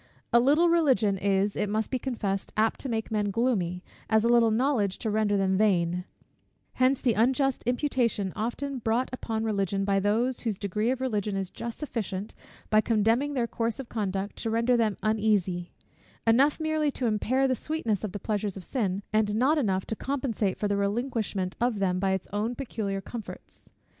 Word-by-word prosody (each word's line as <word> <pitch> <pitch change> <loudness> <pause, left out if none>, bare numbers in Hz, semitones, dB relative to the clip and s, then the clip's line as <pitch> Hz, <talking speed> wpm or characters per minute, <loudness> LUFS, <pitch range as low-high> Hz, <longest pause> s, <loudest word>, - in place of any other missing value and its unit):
A 235 - +7
little 295 +8 +4
Religion 270 -12 +3
is, 200 +1 +1
it 210 -1 -1
must 215 +1 -1
be 255 - 0
confessed, 205 -7 -3
apt 220 +1 +2
to 270 - -5
make 225 -1 -2
men 210 -2 0
gloomy, 195 -6 0 0.3
as 220 -1 +4
a - - +3
little 235 -1 +5
knowledge 220 -4 +1
to 220 - -2
render 210 -1 +2
them 190 0 +1
vain: 180 -4 +2 0.7
hence 255 +1 +2
the 245 -4 +3
unjust 260 +4 +2
imputation 245 -7 0
often 255 +5 -3
brought 230 +3 0
upon 225 -3 -3
Religion 195 -2 0
by 195 0 +2
those, 225 +6 +1
whose 220 -5 -2
degree 210 +3 -1
of 260 0 -1
Religion 210 -5 -1
is 190 -1 -3
just 235 -1 -6
sufficient, 210 -8 -4 0.4
by 215 0 +6
condemning 230 +6 +1
their 245 -3 +1
course 230 0 -2
of 265 - -7
conduct, 200 -2 -3
to 225 - -2
render 230 +2 +2
them 220 -4 +1
uneasy: 205 -5 +1 0.5
enough 265 +7 +4
merely 315 -1 +1
to 260 -2 -3
impair 245 +5 +1
the 260 - +2
sweetness 235 - -2
of 210 - -3
the 205 - -4
pleasures 205 -1 -2
of 185 - -8
sin, 200 -6 -1
and 215 -1 +2
not 275 +7 +3
enough 190 -7 0
to 220 - -3
compensate 235 -7 -1
for 210 - -1
the 205 0 0
relinquishment 205 -3 -1
of 240 -2 +1
them 185 -2 0
by 195 0 +1
its 190 -1 -1
own 220 +4 -1
peculiar 210 -7 -3
comforts. 220 +2 -9
220 Hz, 185 wpm, -27 LUFS, 200-250 Hz, 0.7 s, A